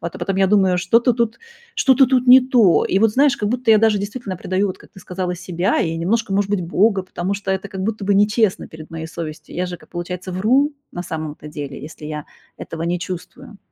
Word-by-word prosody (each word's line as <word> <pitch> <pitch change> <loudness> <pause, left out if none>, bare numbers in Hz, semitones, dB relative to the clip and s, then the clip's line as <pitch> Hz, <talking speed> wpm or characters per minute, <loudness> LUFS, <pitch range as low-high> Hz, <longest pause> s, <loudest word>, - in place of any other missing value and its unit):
А 170 - -2
потом 195 - -2
я 195 0 +3
думаю: 190 -2 +3
"Что-то 230 +7 +3
тут 235 -1 -1 0.4
что-то 270 - +4
тут 255 0 +1
не 255 +1 +9
то". 250 -6 +4 0.2
И 190 - +2
вот, 225 +2 +4
знаешь, 280 +3 +3
как 210 - -2
будто 245 +1 0
я 215 - +7
даже 220 -1 +3
действительно 205 -1 -5
предаю, 185 +3 -1
вот 185 - -6
как - - -18
ты 190 - -14
сказала, 180 0 -4
себя 180 +1 -1
и 165 -1 -1
немножко, 200 +5 -1
может 200 0 0
быть, 205 -3 0
Бога, 195 +3 +2
потому 185 +1 -3
что 195 -1 -4
это 190 +1 -2
как 190 -1 -6
будто 215 0 -3
нечестно 210 +1 +2
перед 155 0 -12
моей 160 -1 -6
совестью. 155 -1 -8
Я 180 - -1
же, 180 0 -6
как, - - -20
получается, 180 +1 -5
вру, 255 +11 +2 0.2
на 175 - -5
самом-то 155 -3 -6
деле. 145 -3 -7
Если 150 +1 -10
я 150 -1 -5 0.3
этого 165 0 -7
не 175 +1 -1
чувствую. 180 +3 -8
190 Hz, 225 wpm, -20 LUFS, 175-220 Hz, 0.4 s, не